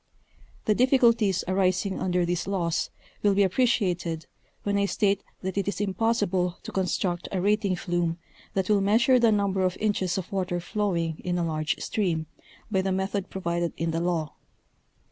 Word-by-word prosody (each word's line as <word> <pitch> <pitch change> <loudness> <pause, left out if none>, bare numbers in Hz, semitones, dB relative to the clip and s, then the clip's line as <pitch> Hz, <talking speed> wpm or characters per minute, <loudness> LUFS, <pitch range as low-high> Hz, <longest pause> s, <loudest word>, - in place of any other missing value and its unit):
The 215 - +4
difficulties 235 -6 +3
arising 185 +1 +1
under 180 -1 +1
these 175 +1 -2
laws 175 -4 0 0.3
will 205 -1 +3
be 200 - +5
appreciated, 180 -6 +1 0.4
when 200 0 +1
I 200 - +3
state 200 0 +1 0.2
that 190 +1 -1
it 200 - -2
is 200 - -2
impossible 195 -3 0
to - - -7
construct 185 -2 -1
a 190 - -1
rating 200 0 +2
flume 175 -2 -1 0.4
that 190 -1 +1
will 210 -2 +3
measure 235 +6 +4
the 230 -2 +5
number 200 -2 +1
of 185 -1 +1
inches 200 -4 0
of 190 - -5
water 185 -2 -1
flowing 170 -4 -1
in 180 -1 -1
a 170 - 0
large 155 -1 -1
stream, 170 -7 -1 0.5
by 190 -2 +2
the 190 0 -1
method 190 +1 -1
provided 170 -2 -2
in 165 0 -1
the 165 +1 -1
law. 170 -3 -1
190 Hz, 165 wpm, -26 LUFS, 175-205 Hz, 0.5 s, be